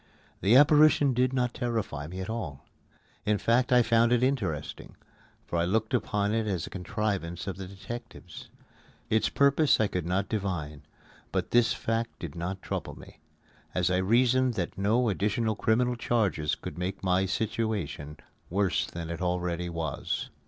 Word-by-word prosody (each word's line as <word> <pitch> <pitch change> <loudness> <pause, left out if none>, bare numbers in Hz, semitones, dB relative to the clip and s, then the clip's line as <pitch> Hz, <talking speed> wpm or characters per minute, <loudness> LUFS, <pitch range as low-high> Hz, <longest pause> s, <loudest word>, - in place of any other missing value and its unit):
The 100 +6 +4
apparition 145 -1 +6
did 125 +1 +2
not 125 -2 0
terrify 110 - -3
me 90 +3 -6
at 95 - -5
all. 90 -12 -5 0.6
In 105 -1 +2
fact 120 +5 +2
I 125 -1 +6
found 115 +1 +3
it 125 0 +3
interesting, 95 - -2 0.5
for 85 - -2
I 85 - +2
looked 110 +4 0
upon 105 0 0
it 110 -1 0
as 90 -6 -1
a - - -10
contrivance 95 -2 -3
of 95 - -4
the 95 -1 -6
detectives. 100 -2 -9 0.6
Its 110 0 +3
purpose 140 +1 +3
I 110 - +4
could 90 -4 -3
not 95 +2 0
divine, 85 -9 -3 0.5
but - - -2
this 120 -1 +4
fact 115 +1 -2
did 80 -5 -7
not 90 +4 -5
trouble - - -4
me, - - -14 0.6
as 90 0 +2
I 90 - +2
reasoned 120 +5 +3
that 90 -4 -3
no 110 +6 +2
additional 105 +2 0
criminal 120 +4 +1
charges 100 -11 0
could - - -8
make 95 +2 -4
my 95 +1 +2
situation 100 -9 -2 0.3
worse 95 0 +1
than 85 -1 -6
it 85 0 -5
already 90 -1 -1
was. 80 -4 -3
100 Hz, 160 wpm, -28 LUFS, 90-115 Hz, 0.6 s, apparition